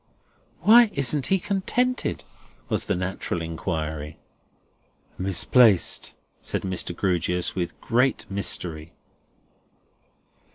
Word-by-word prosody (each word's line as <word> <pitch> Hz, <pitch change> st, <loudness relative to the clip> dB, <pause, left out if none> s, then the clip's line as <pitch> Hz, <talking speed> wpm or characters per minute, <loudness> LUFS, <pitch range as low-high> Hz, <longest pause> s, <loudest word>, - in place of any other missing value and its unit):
"Why 230 Hz, +1 st, +7 dB
isn't 140 Hz, 0 st, +1 dB
he 190 Hz, -, +3 dB
contented?" 245 Hz, +7 st, -1 dB, 0.5 s
was -, -, 0 dB
the -, -, +1 dB
natural 90 Hz, -1 st, -3 dB
inquiry. 80 Hz, -2 st, -4 dB, 1.0 s
"Misplaced," 95 Hz, +2 st, +3 dB, 0.3 s
said -, -, -3 dB
Mr. 90 Hz, -2 st, -2 dB
Grewgious, 90 Hz, -1 st, 0 dB
with 90 Hz, -3 st, -4 dB
great 125 Hz, +2 st, +1 dB
mystery. 85 Hz, -5 st, -3 dB
95 Hz, 85 wpm, -24 LUFS, 85-135 Hz, 1.0 s, Why